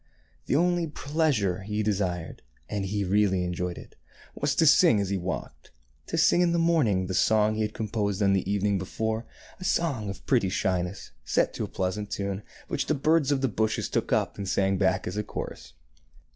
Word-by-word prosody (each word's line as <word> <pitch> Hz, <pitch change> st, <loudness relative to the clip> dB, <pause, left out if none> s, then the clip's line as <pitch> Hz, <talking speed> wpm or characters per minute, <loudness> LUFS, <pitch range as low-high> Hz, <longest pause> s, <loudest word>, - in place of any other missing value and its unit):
The -, -, +1 dB
only 175 Hz, +1 st, +2 dB
pleasure 145 Hz, -, 0 dB
he 105 Hz, +2 st, -2 dB
desired 95 Hz, -5 st, -2 dB
— -, -, -36 dB
and 100 Hz, -2 st, -1 dB
he 100 Hz, +1 st, -1 dB
really 95 Hz, -1 st, +2 dB
enjoyed 90 Hz, 0 st, -3 dB
it -, -, -12 dB, 0.2 s
— -, -, -23 dB
was 140 Hz, -1 st, +1 dB
to 165 Hz, -, +4 dB
sing 155 Hz, -, +6 dB
as 100 Hz, -2 st, -1 dB
he 100 Hz, -, 0 dB
walked, 85 Hz, -9 st, -5 dB, 0.2 s
— 70 Hz, +5 st, -37 dB
to 165 Hz, -, -2 dB
sing 170 Hz, +2 st, +4 dB
in 175 Hz, -1 st, +3 dB
the -, -, +2 dB
morning 150 Hz, -, +2 dB
the 95 Hz, -, -4 dB
song 110 Hz, +2 st, +3 dB
he 110 Hz, -, -2 dB
had 105 Hz, 0 st, -2 dB
composed 105 Hz, -3 st, -2 dB
on 100 Hz, -1 st, +4 dB
the 95 Hz, 0 st, 0 dB
evening 100 Hz, -1 st, +1 dB
before, 110 Hz, +4 st, -3 dB, 0.3 s
a -, -, -8 dB
song 140 Hz, -, 0 dB
of 95 Hz, -, -8 dB
pretty 120 Hz, -8 st, +2 dB
shyness, 90 Hz, 0 st, -2 dB
set -, -, +1 dB
to -, -, -3 dB
a -, -, -7 dB
pleasant 95 Hz, +3 st, -3 dB
tune, 100 Hz, 0 st, -3 dB, 0.3 s
which -, -, -2 dB
the -, -, +2 dB
birds 150 Hz, 0 st, +2 dB
of 135 Hz, -2 st, +1 dB
the 135 Hz, -, +2 dB
bushes 110 Hz, 0 st, -1 dB
took -, -, -1 dB
up -, -, 0 dB
and 100 Hz, -1 st, -3 dB
sang 95 Hz, 0 st, +1 dB
back 95 Hz, -2 st, +1 dB
as 90 Hz, -, -4 dB
a 105 Hz, -, 0 dB
chorus. 60 Hz, -11 st, -7 dB
105 Hz, 210 wpm, -27 LUFS, 95-135 Hz, 0.3 s, sing